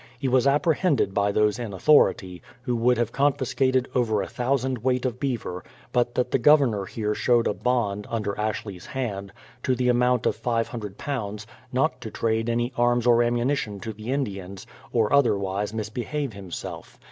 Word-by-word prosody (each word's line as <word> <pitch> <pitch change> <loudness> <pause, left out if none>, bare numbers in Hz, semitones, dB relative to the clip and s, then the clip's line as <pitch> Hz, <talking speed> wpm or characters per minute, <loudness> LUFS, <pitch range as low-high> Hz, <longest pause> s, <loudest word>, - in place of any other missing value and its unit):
He 135 - -2
was 130 +1 +3
apprehended 150 - +2
by 100 +1 +2
those 105 +2 +2
in 115 -4 -5
authority, 95 - +3 0.2
who 125 -1 -1
would 120 +1 +3
have 120 -1 0
confiscated 130 -2 +1
over 115 -4 +1
a - - -5
thousand 130 0 -1
weight 125 +2 0
of 125 -1 -2
beaver, 115 -10 -3 0.3
but 120 0 +1
that 125 - 0
the - - +2
Governor 120 -7 +4
here 105 +1 -2
showed 120 +1 +2
a - - +1
bond, 105 -4 -1
under 105 -3 -2
Ashley's 105 -3 -4
hand, 100 -7 -4 0.3
to 130 - +1
the 125 0 +1
amount 125 -1 +2
of - - +2
£500, 115 -1 -3 0.3
not 130 0 0
to 110 - -6
trade 115 +1 -1
any 120 +2 0
arms 120 0 +2
or 120 -1 +5
ammunition 120 -3 0
to 110 +3 -5
the 110 +4 -6
Indians, 100 -8 -4 0.3
or 110 -1 +1
otherwise 100 -7 +2
misbehave 115 +5 -3
himself. 95 -3 -8
120 Hz, 165 wpm, -25 LUFS, 105-130 Hz, 0.3 s, or